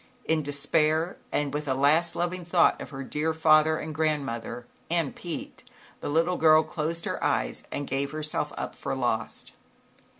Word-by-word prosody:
In 160 Hz, -1 st, +2 dB
despair 155 Hz, +4 st, +1 dB
and 145 Hz, -2 st, -1 dB
with 150 Hz, 0 st, -3 dB
a 130 Hz, -, +1 dB
last 155 Hz, +5 st, +3 dB
loving 175 Hz, +1 st, -2 dB
thought 175 Hz, +1 st, +3 dB
of -, -, -7 dB
her 135 Hz, -2 st, -6 dB
dear 150 Hz, +4 st, -1 dB
father 155 Hz, 0 st, +5 dB
and 155 Hz, -, -5 dB
grandmother 135 Hz, -6 st, -2 dB, 0.2 s
and 165 Hz, -4 st, 0 dB
Pete, 175 Hz, -2 st, -7 dB, 0.4 s
the -, -, -4 dB
little 165 Hz, +4 st, +2 dB
girl 155 Hz, 0 st, +6 dB
closed 160 Hz, +1 st, -3 dB
her -, -, -3 dB
eyes -, -, 0 dB
and 145 Hz, -, -3 dB
gave 140 Hz, +1 st, -1 dB
herself 155 Hz, +1 st, -2 dB
up -, -, -4 dB
for -, -, -4 dB
lost. -, -, -2 dB
155 Hz, 165 wpm, -27 LUFS, 145-165 Hz, 0.4 s, girl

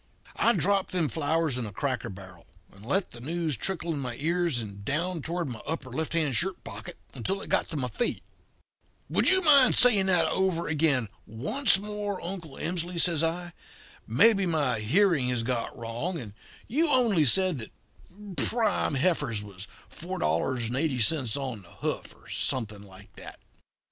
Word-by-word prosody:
"I 235 Hz, -, +4 dB
dropped 195 Hz, -3 st, +1 dB
them 170 Hz, -5 st, +1 dB
flowers 160 Hz, -3 st, 0 dB
in 115 Hz, -, -3 dB
a -, -, -8 dB
cracker 135 Hz, +3 st, -3 dB
barrel, 95 Hz, -2 st, -12 dB, 0.3 s
and 100 Hz, +1 st, -16 dB
let 185 Hz, -, 0 dB
the 120 Hz, -, -11 dB
news 160 Hz, +1 st, -2 dB
trickle 170 Hz, -, -2 dB
in 145 Hz, -, -4 dB
my 125 Hz, -3 st, -4 dB
ears 165 Hz, -1 st, 0 dB
and 100 Hz, -3 st, -7 dB
down 165 Hz, -, -2 dB
toward 170 Hz, +2 st, -3 dB
my 120 Hz, -4 st, -7 dB
upper 145 Hz, -5 st, -4 dB
left 160 Hz, +6 st, -3 dB
hand 155 Hz, -6 st, 0 dB
shirt 185 Hz, +5 st, 0 dB
pocket 110 Hz, 0 st, -9 dB, 0.2 s
until 165 Hz, -, -2 dB
it -, -, -8 dB
got -, -, +1 dB
to 160 Hz, -, -4 dB
my 130 Hz, -3 st, -1 dB
feet. 235 Hz, -, -1 dB, 0.9 s
"'Would -, -, +3 dB
you 375 Hz, 0 st, +5 dB
mind 280 Hz, -5 st, +6 dB
saying 210 Hz, -6 st, +7 dB
that 180 Hz, -2 st, +3 dB
over 190 Hz, -3 st, 0 dB
again 150 Hz, -6 st, +1 dB, 0.2 s
once 195 Hz, -, +3 dB
more, 205 Hz, -1 st, -4 dB
Uncle 170 Hz, -6 st, -6 dB
Emsley?' 175 Hz, +1 st, -3 dB
says 165 Hz, -2 st, +3 dB
I. 175 Hz, +2 st, -2 dB, 0.5 s
'Maybe 195 Hz, -, +4 dB
my 145 Hz, -9 st, 0 dB
hearing 145 Hz, -, +2 dB
has 125 Hz, -2 st, -1 dB
got 120 Hz, -1 st, -3 dB
wrong, 120 Hz, +10 st, -3 dB
and 110 Hz, -9 st, -8 dB, 0.3 s
you 315 Hz, +7 st, +1 dB
only 235 Hz, -, +3 dB
said 180 Hz, +3 st, +2 dB
that 110 Hz, -, -9 dB, 0.8 s
prime 220 Hz, -10 st, 0 dB
heifers 135 Hz, -, 0 dB
was 100 Hz, -1 st, -9 dB, 0.2 s
4.80 125 Hz, -, 0 dB
on 130 Hz, -6 st, -5 dB
the 90 Hz, -, -18 dB
hoof, -, -, -4 dB
or -, -, -21 dB
something 110 Hz, -5 st, -3 dB
like 100 Hz, 0 st, -15 dB
that.' -, -, -11 dB
155 Hz, 165 wpm, -27 LUFS, 120-185 Hz, 0.9 s, saying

